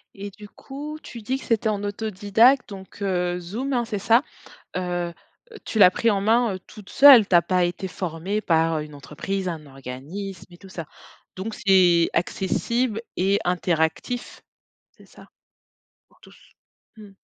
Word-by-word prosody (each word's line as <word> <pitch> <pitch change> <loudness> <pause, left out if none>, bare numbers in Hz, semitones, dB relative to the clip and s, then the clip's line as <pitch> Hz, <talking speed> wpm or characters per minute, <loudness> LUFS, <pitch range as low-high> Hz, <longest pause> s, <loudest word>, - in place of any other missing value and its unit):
Et 200 +1 -7
du 210 +1 -13
coup, 295 +6 -8
tu 235 - -10
dis 260 +6 -2
que - - -12
c'était 225 -1 +1
en 205 -1 -2
autodidacte, 215 +5 +2
donc 195 0 -11
heu, 180 -2 -1
Zoom, 230 +11 -4
hein, 240 -1 0
c'est 215 -3 -4
ça? 230 +6 +4 0.5
Heu, 175 -1 -2 0.4
heu, 440 - -11
tu 220 - -3
l'as 180 -3 +8
pris 230 +4 +1
en 195 -1 0
main 225 -1 +2
toute 210 -2 -13
seule, 270 -7 +8
tu 180 - +2
as 170 - +7
pas 180 0 +1
été 180 +2 -4
formée 180 +4 -4
par 165 -3 +1
une 150 0 -8
entreprise, 185 +7 -5
un 160 -4 -5
organisme 145 +8 -8
et 175 - -14
tout 195 +2 -15
ça? 170 -3 -7 0.5
Donc 205 +4 -5
c'est 180 -4 +4
accessible 225 +6 -1
et 195 +2 +1
interactif, 175 +6 -1 0.6
c'est - - -19
ça, - - -17 0.8
pour - - -29
tous? - - -19 0.4
Mmh. 210 -2 -13
195 Hz, 165 wpm, -23 LUFS, 175-220 Hz, 0.8 s, l'as